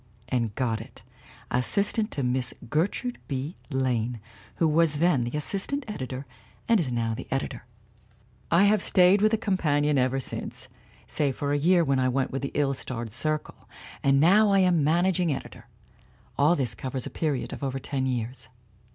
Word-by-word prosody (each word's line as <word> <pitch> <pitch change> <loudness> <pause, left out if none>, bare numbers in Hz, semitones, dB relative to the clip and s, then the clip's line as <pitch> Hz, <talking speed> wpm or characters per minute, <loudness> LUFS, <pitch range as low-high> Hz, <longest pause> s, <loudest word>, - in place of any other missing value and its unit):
And 115 -4 -1
got 115 -4 -1
it, 110 - -13 0.5
assistant 205 - +1
to 140 - -3
Miss 125 0 -1 0.2
Gertrude 200 +10 -1
B. 140 +4 -3
Lane, 125 -4 -1 0.4
who 165 - +2
was 155 0 +3
then 150 -6 +2
the 120 +5 -3
assistant 200 - -2
editor, 130 - -5 0.4
and 230 -3 +4
is 145 -8 -1
now 115 -1 -1
the - - -7
editor. 135 -2 -3 0.8
"I 170 +3 +5
have 205 0 +4
stayed 185 +2 +4
with 215 - +5
the 225 - +1
Companion 150 -9 +1
ever 130 +1 +1
since, - - -5 0.4
save 140 -4 -1
for 145 0 -1
a 145 - +1
year 175 +3 +4
when 135 -3 +1
I 130 0 +2
went 130 +1 0
with 135 - -3
the 140 - -3
ill 140 -2 +2
starred 120 -4 -5
Circle, 155 +6 -3 0.3
and 135 0 +3
now 200 +7 +5
I 195 - +4
am 175 -4 +3
managing 175 +2 +2
editor. 135 - -6 0.7
All 150 +5 +4
this 130 -6 -1
covers 130 -1 -4
a - - -6
period 150 -5 -2
of - - -7
over 135 -1 -2
ten 130 0 -2
years. 120 -2 -4
140 Hz, 175 wpm, -26 LUFS, 130-175 Hz, 0.8 s, I